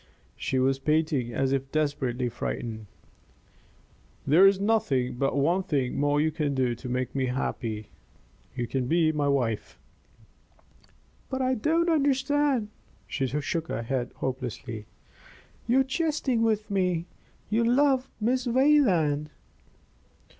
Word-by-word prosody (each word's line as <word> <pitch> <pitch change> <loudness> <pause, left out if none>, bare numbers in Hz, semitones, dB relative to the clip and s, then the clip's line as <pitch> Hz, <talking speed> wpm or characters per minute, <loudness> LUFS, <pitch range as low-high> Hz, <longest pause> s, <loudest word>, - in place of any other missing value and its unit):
She 130 - -2
was 135 +1 +2
panting 150 -4 0
as 135 +3 0
if 135 0 -1
desperately 135 -5 -1
frightened. 110 -2 -5 1.4
"There 165 +8 +7
is 195 0 +4
but 140 - 0
one 170 +7 +2
thing 140 -10 -1
more 145 0 +2
you 155 +1 +2
can 150 -2 -1
do 130 -2 +1
to 125 +2 -8
make 125 0 -2
me 130 -2 0
happy. 115 -4 -3 0.6
You 120 -2 -2
can 125 +1 -2
be 160 +1 +3
my 150 -2 0
wife." 125 -6 -1 1.5
"But 260 0 -2
I 255 0 +2
don't 320 +8 +1
understand!" 280 -5 +2 0.4
She 135 - -2
shook 150 +4 -2
her 115 - -3
head 125 0 -2
hopelessly. 120 -4 -5 0.8
"You 255 +3 +4
are - - +3
jesting 270 -3 0
with 215 -2 0
me. 180 -4 0 0.5
You 225 +2 +2
love 260 +2 +3
Miss 250 +3 0
Wayland." 210 - +3
150 Hz, 125 wpm, -27 LUFS, -, 1.5 s, There